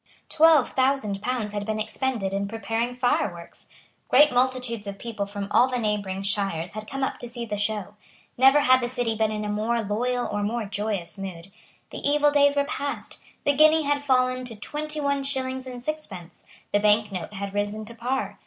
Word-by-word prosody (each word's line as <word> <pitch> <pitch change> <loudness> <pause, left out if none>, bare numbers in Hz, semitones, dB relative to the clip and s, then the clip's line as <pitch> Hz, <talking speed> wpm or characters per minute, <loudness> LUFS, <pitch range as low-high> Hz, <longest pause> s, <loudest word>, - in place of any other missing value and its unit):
Twelve 315 -3 +5
thousand 260 -7 +1
pounds 225 -3 -2
had 205 -1 -2
been 215 +1 -2
expended 220 -3 -2
in 200 0 -1
preparing 225 +3 -2
fireworks. 200 -9 -2 0.4
Great 295 +3 +6
multitudes 250 -4 0
of 200 0 -5
people 215 -2 -4
from 200 0 -5
all 250 - +5
the 255 -1 -2
neighbouring 205 -4 -2
shires 195 -4 0
had 215 0 -7
come 270 0 -3
up - - -2
to 240 - -6
see 240 0 -5
the 210 -2 -3
show. 205 -1 -2 0.4
Never 270 +3 +6
had 255 -1 +5
the 240 - -2
City 245 -3 -1
been 220 0 +1
in 210 0 -3
a - - -2
more 220 +3 0
loyal 245 +4 -1
or 205 - -1
more 220 +2 -1
joyous 200 -4 -3
mood. 190 -1 -7 0.4
The - - -6
evil 295 +1 +3
days 285 0 +4
were 285 - +3
past. 285 -1 -4 0.3
The 285 - +4
guinea 310 +2 +6
had 285 0 0
fallen 255 -2 +2
to 235 -2 -6
twenty 300 +8 -5
one 280 -1 0
shillings 260 -1 -2
and 250 -1 -8
sixpence. 195 - -6 0.3
The 205 - +4
bank 210 0 +3
note 185 +2 -5
had 200 0 -5
risen 205 +1 -2
to 235 - -8
par. 250 +3 -3
230 Hz, 195 wpm, -25 LUFS, 205-260 Hz, 0.4 s, Great